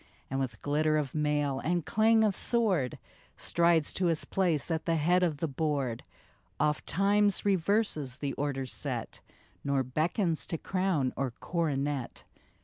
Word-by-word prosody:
And 135 - -1
with 125 -5 -4
glitter 155 +1 +1
of 140 -4 -2
mail, 150 -3 0
and 170 +2 -1
clang 220 +1 +4
of 205 -3 +2
sword, 195 - +1 0.4
Strides 170 -3 +2
to 180 - 0
his 165 -2 +2
place 170 -7 0
at 160 -1 -2
the 165 - +1
head 175 +4 +3
of 165 -5 +1
the 165 - -2
board, 140 -5 -2 0.6
Oft 150 +1 0
times 200 +3 +3
reverses 190 - 0
the 140 -2 -3
order 140 -2 -2
set, 125 - -4 0.4
Nor 140 -1 +1
beckons 160 - -1
to 165 - -2
crown 185 -8 0
or 135 -1 -1
coronet 145 -6 -2
155 Hz, 145 wpm, -30 LUFS, 140-180 Hz, 0.6 s, clang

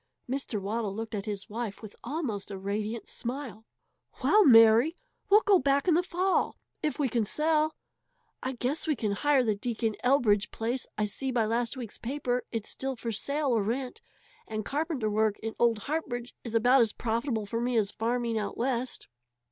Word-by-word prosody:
Mr. 255 -4 -2
Waddle 205 0 -2
looked 225 +1 -5
at 200 -2 -3
his 205 -2 -4
wife 225 -1 -5
with 215 - -9
almost 245 -7 -3
a 200 - -5
radiant 210 +3 -3
smile. 240 -4 -5 0.6
"Well, 425 0 +6
Mary, 230 - +7 0.3
we'll 415 +2 +7
go 400 -3 +5
back 280 +4 +2
in 350 - +5
the 340 - +4
fall 370 +1 0 0.2
if 305 -2 -1
we 290 -3 +1
can 235 -1 +1
sell. 310 +6 +1 0.7
I 260 - -2
guess 265 +7 -2
we 305 - +2
can 215 -4 -1
hire 275 +6 +3
the 220 -3 +2
Deacon 220 +1 -2
Elbridge 230 -6 +3
place 240 +3 -2
I 210 - +1
see 265 +6 -2
by 240 -3 +1
last 235 +4 -1
week's 235 -5 -7
paper 250 -1 -2
it's 225 -3 -3
still 265 0 -3
for 230 0 -4
sale 280 +7 0
or 220 - +2
rent, 245 +5 -3 0.5
and 215 -1 -4
carpenter 295 -5 -1
work 215 0 +1
in 225 0 -5
old 230 -3 +3
Hartbridge 250 -6 -3
is 230 -2 -5
about 245 +3 +5
as 225 -2 +2
profitable 230 -1 -1
for 230 +3 -3
me 245 0 0
as 205 -2 +1
farming 230 0 -1
out 210 - -4
West." 250 0 -2
235 Hz, 185 wpm, -29 LUFS, 220-275 Hz, 0.7 s, Mary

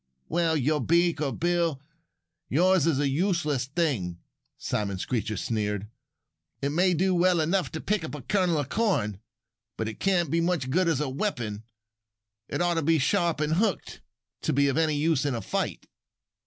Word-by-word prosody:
"Well, 155 -3 +1
beak 170 +3 +2
or 140 -3 0
bill, 170 0 0 0.7
yours 180 +2 +3
is 160 -5 +2
a 145 0 +1
useless 150 -4 0
thing," 135 - -1 0.4
Simon 100 -2 -2
Screecher 110 +1 -2
sneered. 105 -2 -2 0.7
"It 140 - -1
may 180 +4 +2
do 185 +3 +2
well 180 0 +3
enough 175 +4 +1
to 160 - -3
pick 210 -4 0
up 155 - -5
a 145 - -8
kernel 185 -5 +1
of 145 -3 -2
corn. 140 - 0 0.6
But 110 - -2
it 110 - -6
can't 175 -6 +1
be 170 - +2
much 165 -7 0
good 180 +4 +2
as 160 -4 +1
a 150 - -1
weapon. 120 - -3 0.8
It - - -1
ought 175 0 +2
to - - -1
be 160 +2 +3
sharp 170 +2 +1
and 150 +1 +1
hooked 200 -7 -1 0.4
to - - 0
be 140 +1 +3
of 135 - -1
any 160 -1 +2
use 150 -1 +1
in 145 -3 0
a - - -2
fight." - - -3
155 Hz, 175 wpm, -27 LUFS, 130-175 Hz, 0.8 s, yours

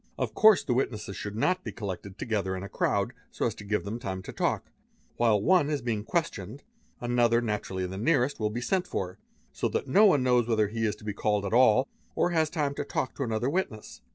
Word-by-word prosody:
Of - - -2
course 220 -3 +6
the 125 - 0
witnesses 110 -6 -2
should 105 +2 -5
not 185 +11 +1
be - - -5
collected 100 -2 -6
together 100 -5 -1
in 95 - -6
a 100 - -7
crowd - - 0 0.2
so - - -2
as - - 0
to - - -11
give 105 +1 -1
them 110 +4 -4
time 95 -4 -4
for - - -7
talk; - - -1 0.5
while 115 -3 +3
one 165 - +3
is 145 -5 -2
being 110 -4 -1
questioned, 125 - -3 0.4
another, 120 -1 +2
naturally 105 -5 -2
the 95 +1 -5
nearest, 140 0 +2
will 105 -1 0
be 120 +3 -4
sent 185 +6 0
for; 90 -1 -4 0.3
so - - -1
that - - -2
no 205 +10 +6
one 145 -9 +4
knows 125 -2 +3
whether 110 -3 +2
he 110 0 -1
is 105 - -1
to 105 - -17
be 105 - -2
called 105 0 0
at 100 - -3
all, 125 +1 +5 0.3
or 175 - +2
has 160 -2 +2
time 150 -3 -1
to 140 - -3
talk 130 -2 -2
to - - -5
anothei 120 +1 0
witness. 145 - -3
115 Hz, 230 wpm, -28 LUFS, 105-140 Hz, 0.5 s, course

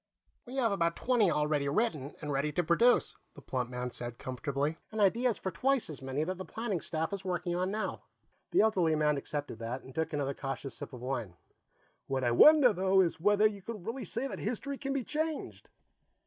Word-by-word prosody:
"We 250 - -7
have 240 -5 +2
about 170 -4 +1
twenty 240 -6 +3
already 150 -2 +1
written 150 - -1
and 150 - -2
ready 140 +2 0
to 175 - +1
produce," 230 +10 +3 0.2
the 145 - -11
plump 125 -2 -2
man 125 0 -4
said 120 -1 -6
comfortably, 140 +4 -2
"and 220 - -4
ideas 230 +3 +3
for 190 - -4
twice 255 +2 +1
as 145 - -9
many 135 +3 -2
that 185 +3 -3
the - - -3
planning 215 -4 -3
staff 160 +2 -2
is 200 0 -4
working 180 -1 -2
on 185 +1 0
now." 215 +2 -3 0.5
The - - +4
elderly 185 -7 +3
man 150 -1 +2
accepted 145 -4 -4
that 120 +3 -4
and 130 - -12
took 160 +3 -1
another 140 -2 -1
cautious 135 -1 -5
sip - - -8
of 125 - -8
wine. 120 -8 -3 0.7
"What 135 -1 -1
I 120 - +2
wonder, 275 - +7
though, 190 0 +3
is 170 -3 0
whether 205 +4 +4
you 205 -2 +1
can 210 -1 -7
really 235 +4 -4
say 235 +8 -2
that - - -6
history 260 +5 -3
can 275 -1 -3
be 275 -2 -1
changed." 310 +3 -3
170 Hz, 205 wpm, -31 LUFS, 140-220 Hz, 0.7 s, wonder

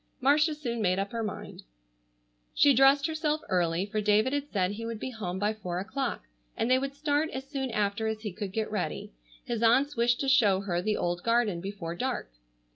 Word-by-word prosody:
Marcia 295 +4 +3
soon 240 -6 -3
made 185 -2 +2
up 195 +1 -2
her 230 - -3
mind. 210 -2 -6 0.9
She 285 - +6
dressed 270 +3 +5
herself 310 -1 -1
early, 175 0 +1
for 215 +1 -2
David 210 +5 +3
had 285 0 -2
said 190 -3 +1
he 215 +3 -6
would 230 -2 -5
be 260 - -4
home 190 -6 -4
by 205 +3 0
four 180 -5 -5
o'clock 195 - -3 0.3
and 235 - 0
they 255 - +5
would 275 +1 -4
start 295 +1 0
as 265 -2 -6
soon 270 -2 -3
after 210 0 -1
as 220 -1 -3
he 210 -4 -5
could 195 0 -5
get 220 +1 -2
ready. 205 -4 -3 0.3
His 235 -2 -3
aunts 260 +6 +3
wished 240 +1 +2
to 275 - -1
show 210 -8 +4
her 175 -3 -1
the 210 +3 0
old 175 0 -1
garden 230 -6 +1
before 190 -3 -5
dark. 250 - -3
225 Hz, 205 wpm, -29 LUFS, 200-270 Hz, 0.9 s, She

